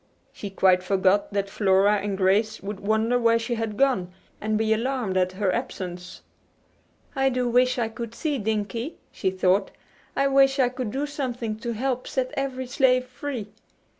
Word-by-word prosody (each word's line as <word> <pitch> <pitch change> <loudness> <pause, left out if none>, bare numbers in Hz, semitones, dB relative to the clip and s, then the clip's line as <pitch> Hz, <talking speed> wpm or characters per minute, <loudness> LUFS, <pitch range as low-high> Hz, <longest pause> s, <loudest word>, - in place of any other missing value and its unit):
She 205 - -6
quite 185 -1 +3
forgot 195 +2 +2
that 200 0 -1
Flora 200 +1 +3
and 200 -1 -3
Grace 205 +3 +2
would 200 0 -5
wonder 220 +4 +1
where 230 -1 +4
she 230 +1 -3
had 225 -2 -3
gone, 250 -10 +2 0.3
and 215 0 0
be 220 0 +2
alarmed 235 -3 -1
at 185 0 +1
her 190 -1 0
absence. 180 -7 -5 0.9
"I 270 0 +3
do 250 -1 0
wish 250 +1 +3
I 235 -2 +1
could 230 +1 -7
see 295 -5 -1
Dinkie," 220 +6 -2 0.2
she 190 - -1
thought. 185 +1 +2 0.5
"I 275 0 +2
wish 270 0 +4
I 255 -3 +3
could 250 -2 -4
do 270 +6 -2
something 250 -6 -3
to 235 +1 -4
help 255 +2 -2
set 255 -1 -1
every 265 -1 -2
slave 255 0 +2
free." 250 -4 -6
225 Hz, 170 wpm, -25 LUFS, 200-255 Hz, 0.9 s, where